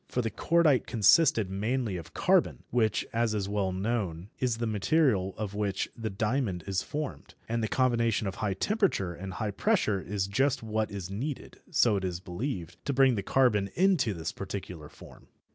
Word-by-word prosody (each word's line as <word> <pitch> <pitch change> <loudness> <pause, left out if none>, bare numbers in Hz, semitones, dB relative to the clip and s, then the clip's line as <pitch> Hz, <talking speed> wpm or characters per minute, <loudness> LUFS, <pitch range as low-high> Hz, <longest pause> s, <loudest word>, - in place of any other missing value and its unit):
For 125 - -1
the 115 - -2
cordite 155 +2 +3
consisted 115 - +4
mainly 110 +2 -1
of 85 -3 -8
carbon, - - +2
which, 110 -3 +1
as 115 -1 +1
is 100 -2 -1
well 100 -2 0
known, 95 -3 -2
is 125 -3 0
the 115 - -2
material 110 - +1
of 105 -2 -4
which 100 -2 -1
the 115 -1 -4
diamond 105 - -1
is 95 -1 -1
formed, 150 -1 -6
and 115 +1 -1
the 110 - 0
combination 115 -2 +1
of 95 - -2
high 100 -3 0
temperature 190 - 0
and 95 +2 -7
high 105 +2 -2
pressure 110 - +1
is 100 0 -2
just 130 +6 +1
what 110 -1 -1
is 95 -2 -6
needed, 130 +8 -5
so 110 -4 +3
it 95 - -3
is 90 -2 -2
believed, 90 - -5
to 140 - 0
bring 135 -1 +5
the 105 - -1
carbon 105 -3 +2
into 170 - +3
this 80 -1 -4
particular 90 -5 -7
form. - - -15
105 Hz, 180 wpm, -29 LUFS, 95-125 Hz, -, bring